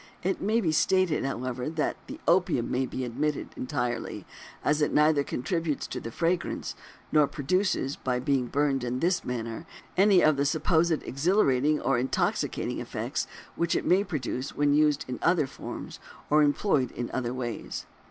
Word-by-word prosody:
It 190 +2 -1
may 220 +4 +2
be 165 -6 +1
stated, 180 +1 +2
however, 130 0 -3
that 155 -1 -1
the - - -8
opium 175 -8 +2
may 130 +1 0
be 130 - -4
omitted 145 +5 -2
entirely, 120 -2 -3 0.4
as 150 +1 +2
it 150 - +2
neither 150 -1 +4
contributes 160 +3 -2
to - - -5
the 115 - -6
fragrance, 170 +8 -1 0.4
nor 150 -2 +5
produces, 150 -1 0
by 125 -1 -1
being 130 -1 +1
burned 140 -1 +1
in 125 +1 -2
this 180 +4 +1
manner, 120 +5 -4 0.3
any 195 -1 +5
of 155 -2 +4
the 140 - +1
supposed 160 +1 +2
exhilarating 150 -2 +2
or 130 -3 +1
intoxicating 130 +2 -1
effects - - -3 0.3
which 170 -1 0
it - - -1
may 190 +3 +4
produce 135 - -4
when 145 0 +3
used 150 0 +3
in 125 - -4
other 170 -3 +3
forms - - -8 0.3
or 150 +1 +6
employed 145 - +2
in 120 - -4
other 120 -2 -1
ways. 125 -2 -4
145 Hz, 160 wpm, -28 LUFS, 130-170 Hz, 0.4 s, or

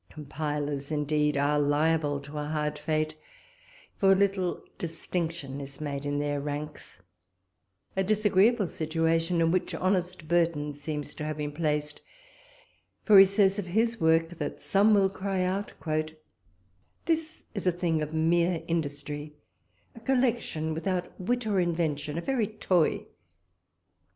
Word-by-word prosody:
Compilers, 145 -1 -4
indeed, 150 0 +1
are 145 +1 +2
liable 145 0 +2
to 145 +2 -7
a 150 - -3
hard 150 0 -2
fate, 155 0 -1 0.9
for 195 -1 +5
little 190 -2 +1 0.2
distinction 165 -4 -3
is 140 0 -7
made 145 -1 -4
in 145 0 -1
their 145 -1 -1
ranks; 145 -8 -6 0.9
a 190 - +2
disagreeable 210 +1 +3
situation, 165 +2 0
in 165 0 +3
which 185 0 0
honest 180 -3 -1
Burton 165 -3 +1
seems 145 0 -5
to 150 - -6
have 155 0 -3
been 150 -1 -3
placed; 150 -1 -2 1.0
for 205 -3 +8
he 195 - +10
says 195 0 +3
of 190 - -4
his 225 +4 0
work, 165 0 +4
that 175 - -5
some 210 +2 +4
will 195 -1 +4
cry 190 -1 -2
out, 190 +3 -2 1.3
"This 320 -1 -1
is 200 -3 -3
a - - +5
thinge 170 -2 0
of 150 0 -3
meere 170 +2 +2
industrie; 145 -2 -3 0.6
a 230 - -12
collection 235 -10 0
without 180 +2 -2
wit 245 +5 -1
or 205 -3 +1
invention; 160 -4 -1
a - - -1
very 245 -1 0
toy! 185 -6 +1
165 Hz, 135 wpm, -28 LUFS, 150-190 Hz, 1.3 s, he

